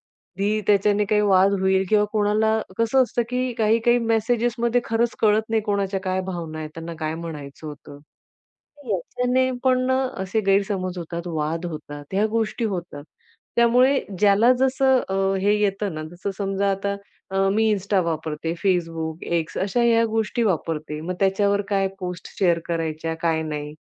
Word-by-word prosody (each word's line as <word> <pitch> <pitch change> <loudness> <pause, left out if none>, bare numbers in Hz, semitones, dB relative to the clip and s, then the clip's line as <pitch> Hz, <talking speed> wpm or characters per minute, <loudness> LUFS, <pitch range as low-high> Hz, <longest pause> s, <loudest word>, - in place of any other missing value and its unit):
कधी 200 +3 -2
त्याच्याने 205 0 +3
काही 210 +1 +2
वाद 195 -1 +4
होईल 190 0 +2
किंवा 210 -1 +4
कोणाला, 215 +1 +2 0.2
कसं 230 +4 +3
असतं, 240 -1 -1
की 250 0 -1
काही-काही 230 +2 +3
मेसेजेसमध्ये 235 +1 +1
खरंच 230 +1 0
कळत 215 0 +4
नाही, 220 -1 +1
कोणाच्या 200 -2 -1
काय 185 -1 -1
भावना 165 -4 -5
आहेत. 155 -1 -5
त्यांना 165 +1 -7
काय 155 0 -2
म्हणायचं 155 -3 -8
होतं. 145 -1 -10 0.9
याच्याने 250 +7 0
पण 255 -1 +4
ना, 260 0 +2 0.2
असे 190 +4 -1
गैरसमज 195 -2 +1
होतात. 170 0 -6
वाद 160 +1 -2
होतात. 145 -3 -7
ह्या 205 +3 +2
गोष्टी 225 +1 -1
होतात. 175 -8 -4 0.5
त्यामुळे 250 +3 +4 0.2
ज्याला 210 +4 +5
जसं 265 0 +3
अ, 190 - -2 0.3
हे 205 +2 +3
येतं 200 -2 0
ना, 155 - -4
जसं 185 +3 -4
समजा 200 0 0
आता 200 +1 -2 0.3
अ, 190 - -3 0.2
मी 220 +2 +2
Insta 200 0 0
वापरते, 160 0 -3
Facebook, 165 -3 -1
X 160 -1 -5
अशा 200 +5 0
ह्या 230 -1 +4
गोष्टी 225 +2 0
वापरते. 160 -6 -2
मग 175 +4 -4
त्याच्यावर 200 +1 +2
काय 195 -1 +1
पोस्ट 180 -1 -6
शेअर 175 -5 +3
करायच्या, 160 -1 -2
काय 165 -1 +1
नाही, 150 -1 -5
195 Hz, 155 wpm, -23 LUFS, 165-220 Hz, 0.9 s, ज्याला